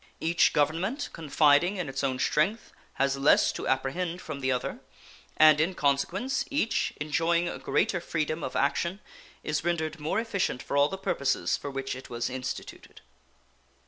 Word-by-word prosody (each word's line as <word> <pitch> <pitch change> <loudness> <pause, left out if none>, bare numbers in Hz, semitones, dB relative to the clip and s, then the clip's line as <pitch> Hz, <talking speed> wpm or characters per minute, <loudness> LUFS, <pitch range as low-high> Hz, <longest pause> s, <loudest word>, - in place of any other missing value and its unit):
Each 170 +2 +3
Government, 170 - 0
confiding 155 +4 +3
in 180 -4 -3
its 135 +1 -4
own 130 -2 0
strength, 170 - 0 0.2
has 135 0 0
less 135 +2 +4
to - - -5
apprehend 165 +7 -1
from 155 -5 -6
the 130 -1 0
other, 125 -1 -2 0.6
and 155 -1 +7
in 180 +4 0
consequence 175 - 0
each, 280 -5 0
enjoying 165 +3 +1
a - - -5
greater 190 -4 0
freedom 155 -1 -2
of 130 - -4
action, 170 +7 0 0.4
is 155 -1 -1
rendered 160 -2 -1
more 155 +7 -1
efficient 200 - -2
for - - -4
all 140 +1 +4
the 190 - -5
purposes 140 -7 0
for 145 - -6
which 135 -1 -4
it 130 - -10
was 120 +1 -3
instituted. 125 0 -7
155 Hz, 160 wpm, -28 LUFS, 140-175 Hz, 0.6 s, and